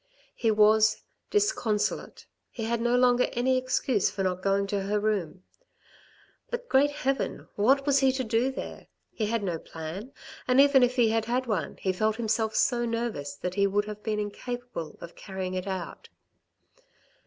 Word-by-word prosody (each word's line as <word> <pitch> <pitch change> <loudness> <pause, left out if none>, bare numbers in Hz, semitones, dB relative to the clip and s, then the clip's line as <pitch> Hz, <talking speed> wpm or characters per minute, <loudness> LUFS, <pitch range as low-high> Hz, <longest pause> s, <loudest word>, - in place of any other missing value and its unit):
He 230 - 0
was 215 0 +4 0.3
disconso 230 - +1
late, - - -13 0.2
he 230 - -6
had 230 +1 -1
no 240 +1 +2
longer 250 0 +4
any 255 +2 +2
excuse 255 -3 +1
for 195 -1 -3
not 185 -1 -1
going 195 0 +1
to 200 0 -2
her 205 +2 0
room. 195 -4 -2 1.1
But, 485 0 -4
Great 275 +2 +4
Heaven! 270 -2 -2
What 270 +7 +3
was 280 -1 +4
he 270 -1 +4
to 260 0 -1
do 235 +3 +1
there? 265 - -7 0.2
He 215 - -2
had 230 -1 -1
no 175 -4 -2
plan, 165 +12 -7 0.4
and 255 +1 +4
even 280 -1 +6
if 250 0 +3
he 240 -3 +4
had 225 0 +1
had 250 +3 0
one, 195 - -2
he 190 - -1
felt 215 +3 +1
himself 220 -1 -1
so 240 -2 +2
nervous 230 -12 -3
that 180 +5 -4
he 200 +1 +2
would 205 +1 0
have 210 0 -7
been 215 -1 -2
incapable 225 -3 -5
of 170 - -9
carrying 190 -2 -5
it 185 +1 -3
out. 185 -3 -5
220 Hz, 175 wpm, -27 LUFS, 200-250 Hz, 1.1 s, even